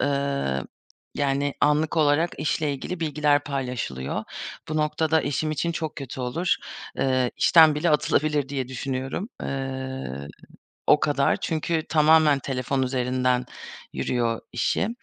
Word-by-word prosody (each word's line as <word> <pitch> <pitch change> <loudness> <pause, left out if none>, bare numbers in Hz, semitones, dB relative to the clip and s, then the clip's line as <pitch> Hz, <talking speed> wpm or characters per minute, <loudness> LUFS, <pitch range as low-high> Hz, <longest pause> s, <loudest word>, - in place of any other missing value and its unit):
eee, 140 - 0 0.6
yani, 140 0 0
anlık 150 +2 +2
olarak 155 +2 +3
işle 150 -1 0
ilgili 170 +6 -5
bilgiler 150 -2 +2
paylaşılıyor. 125 - -3 0.4
Bu 155 - -2
noktada 155 0 +1
eşim 145 +2 -1
için 165 +3 -1
çok 160 -2 -4
kötü 135 -2 -6
olur. 145 +9 0 0.4
Eee, 130 -2 +2
işten 160 -3 +6
bile 160 +3 +1
atılabilir 150 -1 +2
diye 135 -3 -3
düşünüyorum. 135 - -3
Eee, 130 - -4 0.6
o 150 - +6
kadar. 140 -2 +2
Çünkü 160 0 -1
tamamen 155 -2 +5
telefon 130 0 -2
üzerinden 125 -1 0 0.5
yürüyor 115 -2 -1
işi. 120 - 0
140 Hz, 120 wpm, -25 LUFS, 130-155 Hz, 0.6 s, işten